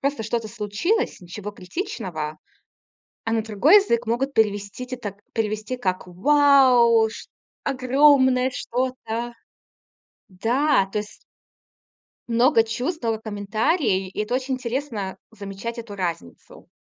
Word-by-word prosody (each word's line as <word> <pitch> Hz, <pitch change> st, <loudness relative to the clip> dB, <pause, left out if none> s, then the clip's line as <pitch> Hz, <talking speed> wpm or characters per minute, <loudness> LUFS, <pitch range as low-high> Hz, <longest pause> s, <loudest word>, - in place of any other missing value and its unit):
просто 280 Hz, -4 st, -1 dB
что-то 225 Hz, 0 st, -2 dB
случилось, 225 Hz, -, -1 dB
ничего 190 Hz, +4 st, -7 dB
критичного. 185 Hz, -, -5 dB, 0.9 s
А 225 Hz, -, -1 dB
на 225 Hz, -, +2 dB
другой 220 Hz, -, +4 dB
язык 235 Hz, -, 0 dB
могут 260 Hz, +5 st, 0 dB
перевести 205 Hz, +1 st, 0 dB
те 255 Hz, -, -4 dB
так, 205 Hz, -5 st, -6 dB, 0.2 s
перевести 215 Hz, +2 st, -2 dB
как: 185 Hz, -6 st, -2 dB
"Вау! 245 Hz, +1 st, +5 dB
Ш 225 Hz, -, -10 dB, 0.4 s
Огромное 260 Hz, -1 st, +4 dB
что-то!" 240 Hz, -2 st, -3 dB, 1.0 s
Да, 230 Hz, +5 st, +2 dB
то -, -, 0 dB
ес 210 Hz, -, -10 dB, 1.1 s
Много 235 Hz, +2 st, +4 dB
чувствовало 230 Hz, +1 st, -2 dB
комментарии, 215 Hz, -, 0 dB
и 185 Hz, -, -4 dB
это 220 Hz, +4 st, -1 dB
очень 260 Hz, +1 st, -2 dB
интересно- 240 Hz, -6 st, -3 dB, 0.2 s
замечать 200 Hz, +4 st, -6 dB
эту 225 Hz, -3 st, -8 dB
разницу. 170 Hz, -, -6 dB
230 Hz, 115 wpm, -23 LUFS, 205-260 Hz, 1.1 s, Вау